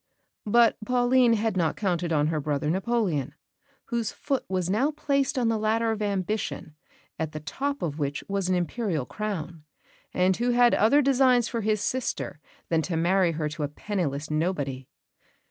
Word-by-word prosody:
But 235 +2 +4
Pauline 245 +1 +3
had 220 -1 0
not 165 -4 +1
counted 175 -4 -1
on 150 -1 +2
her 160 -1 -1
brother 150 +1 -1
Napoleon, 185 - -1 0.5
whose 235 -3 -1
foot 275 -3 -2
was 185 -2 -1
now 220 +10 +2
placed 280 -3 0
on 245 -2 +2
the 225 -1 +1
ladder 225 +1 +1
of 215 -1 -3
ambition, 200 -4 -2 0.5
at 160 -1 -3
the 155 - -4
top 280 - -3
of 155 -2 -3
which 145 -1 -2
was 195 -2 -1
an 185 - +3
Imperial 175 - -1
crown, 170 -6 -5 0.5
and 185 +1 +2
who 240 +1 0
had 245 0 +5
other 280 +8 +4
designs 255 -3 +4
for 230 -1 -3
his 215 -1 0
sister 250 - -2 0.3
than 165 -1 +2
to 165 0 -2
marry 175 +1 +2
her 155 -1 -2
to 155 +1 -7
a 145 - 0
penniless 155 -3 -3
nobody. 145 -5 -2
195 Hz, 170 wpm, -26 LUFS, 160-235 Hz, 0.5 s, had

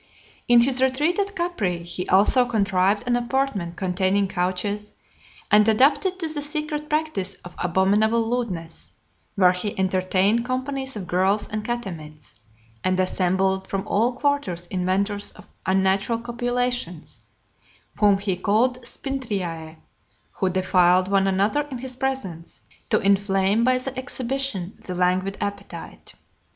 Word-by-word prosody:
XLIII. - - -29
In - - +8
his 255 +1 +3
retreat 290 +8 +1
at 405 0 -2
Capri, 215 - -2
he 175 +1 -5
also 210 +7 +5
contrived 200 -3 +1
an 245 0 +1
apartment 240 -8 -1
containing 190 +1 +1
couches, 190 +3 -2 0.6
and 210 +1 +6
adapted 280 - +3
to 335 -3 -2
the 310 -2 -3
secret 300 0 -2
practice 305 -12 0
of 175 - -9
abominable 210 +6 +2
lewdness, 195 -9 -4 0.4
where 185 -3 +5
he 185 +3 -4
entertained 190 +4 +1
companies 265 +1 -3
of 200 -3 -5
girls 190 +4 +1
and 215 0 -3
catamites, 170 - -6 0.5
and 185 0 +1
assembled 190 +1 +1
from 195 -1 -3
all 230 +5 +1
quarters 260 - -1
inventors 195 +3 0
of - - -15 0.2
unnatural 190 +4 +2
copulations, 245 -6 -3 0.8
whom 205 -2 +5
he 195 -2 -1
called 235 +7 +1
Spintriae, 195 - -4 0.6
who 190 - -1
defiled 185 0 +3
one 195 -1 +3
another 205 +10 +1
in 260 - -5
his 255 +1 -6
presence, 235 -11 -4 0.3
to - - +4
inflame 195 +2 +2
by 255 +1 +3
the 255 +1 -5
exhibition 260 -7 -3
the 185 -5 -6
languid 185 +2 0
appetite. 200 0 -7
205 Hz, 130 wpm, -23 LUFS, 185-250 Hz, 0.8 s, In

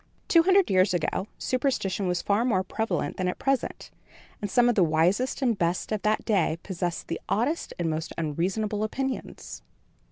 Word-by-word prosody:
Two 335 - +6
hundred 380 - +4
years 185 0 +4
ago, 175 +4 -1
superstition 240 -8 -1
was 180 -1 -1
far 205 +3 +2
more 205 -7 +1
prevalent 220 +3 -2
than 185 - -1
at 180 - -2
present, 270 -1 -2 0.5
and 205 - -3
some 245 +4 +4
of 245 - +4
the 205 - +2
wisest 175 - +1
and 240 -3 +2
best 175 +3 -1
of 215 -2 -1
that 215 0 0
day 185 -6 +1
possessed 175 -2 -3
the 165 - -4
oddest 265 +10 0
and 175 - -1
most 160 0 -2
unreasonable 190 +7 -1
opinions. 265 +4 -4
200 Hz, 170 wpm, -27 LUFS, 175-245 Hz, 0.5 s, Two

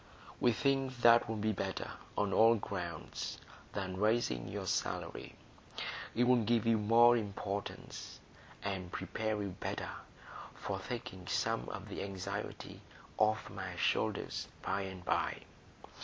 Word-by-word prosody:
We 120 - +5
think 135 +1 +1
that'll 115 -1 +6
be 110 +1 +1
better, 95 -2 -3 0.3
on 100 -1 +2
all 115 +1 +7
grounds, 90 -6 -4 0.4
than 95 -2 -3
raising 105 - +2
your - - -4
salary. - - -2 0.8
It'll 125 0 +5
give 115 0 +2
you 115 -1 +4
more 115 +3 +7
importance, 100 -2 -4 0.4
and 95 -3 -3
prepare 110 -1 -2
you 100 - -2
better 90 - -4 0.6
for 100 -1 -3
taking 95 -4 -6
some - - 0
of - - -6
the - - -5
anxiety 95 -2 -5 0.4
off 110 0 +3
my 95 -2 -5
shoulders 85 - 0 0.2
by 100 - 0
and 95 -2 -6
by. - - 0
105 Hz, 125 wpm, -35 LUFS, 95-115 Hz, 0.8 s, all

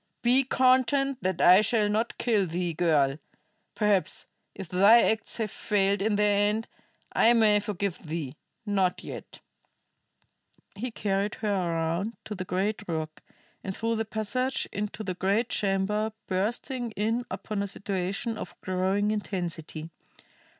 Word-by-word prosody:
"Be 250 +3 +5
content 260 +1 +2
that 185 -2 -1
I 185 +3 +8
shall 215 -1 +2
not 220 +3 -1
kill 215 -6 +1
thee, 175 +1 -2
girl. 150 -4 +2 0.6
Perhaps, 210 -3 +1 0.3
if 195 -2 -7
thy 200 +7 +6
acts 220 0 0
have 220 -3 -2
failed 200 -1 +1
in 210 +1 +1
their 205 0 +3
end, 220 +2 -2 0.5
I 235 - +5
may 215 -3 +5
forgive 200 -3 -3
thee; 155 -4 -5 0.3
not 195 -3 0
yet." - - -9 1.3
He 240 +5 -4
carried 200 -2 -1
her 210 -2 -1
around 170 +3 -1
to 215 - -5
the 185 -2 -5
great 195 +4 -1
rock, 155 -2 -4 0.4
and 190 -1 -5
through 230 0 0
the 225 - -1
passage 235 +5 -1
into 210 +1 -4
the 185 -3 -3
great 200 +6 0
chamber, 210 +2 0
bursting 235 +6 -2
in 225 +4 0
upon 210 -2 -4
a 200 - -2
situation 200 +3 -3
of - - -8
growing 190 +3 0
intensity. 170 -6 -4
205 Hz, 140 wpm, -27 LUFS, 185-220 Hz, 1.3 s, I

